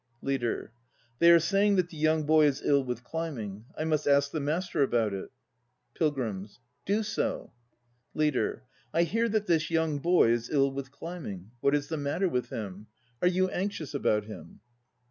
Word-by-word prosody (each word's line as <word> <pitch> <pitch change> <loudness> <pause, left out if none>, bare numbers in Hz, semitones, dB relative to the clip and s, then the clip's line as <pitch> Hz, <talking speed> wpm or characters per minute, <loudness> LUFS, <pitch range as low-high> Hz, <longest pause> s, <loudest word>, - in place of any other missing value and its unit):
LEADER. 120 -4 -2 0.5
They 170 - +7
are 170 - +9
saying 195 +5 +2
that 180 -2 +1
the 165 - -12
young 155 +1 +2
boy 155 0 +5
is 140 -1 -1
ill 140 -1 +3
with 125 -2 -4
climbing. 120 -9 -5
I - - -1
must 155 -2 0
ask 140 0 +4
the 155 - -2
Master 160 +4 -1
about 115 -6 +2
it. 95 - -5 0.6
PILGRIMS. 115 - -2 0.3
Do 210 +3 +2
so. 215 +1 -2 0.6
LEADER. 150 -5 0 0.3
I 170 - +5
hear 225 +7 0
that 215 -1 0
this 160 -5 +1
young 160 -3 +1
boy 170 -6 +4
is 120 0 -1
ill 140 -2 +2
with 135 0 -5
climbing. 130 - -7
What 140 +3 +3
is 145 0 -2
the 160 - -2
matter 145 +7 0
with 125 -7 -2
him? 105 -1 -6 0.3
Are 180 - +4
you 185 +1 +2
anxious 185 -6 -3
about 105 -1 +1
him? 105 - -11
150 Hz, 175 wpm, -29 LUFS, 125-170 Hz, 0.6 s, are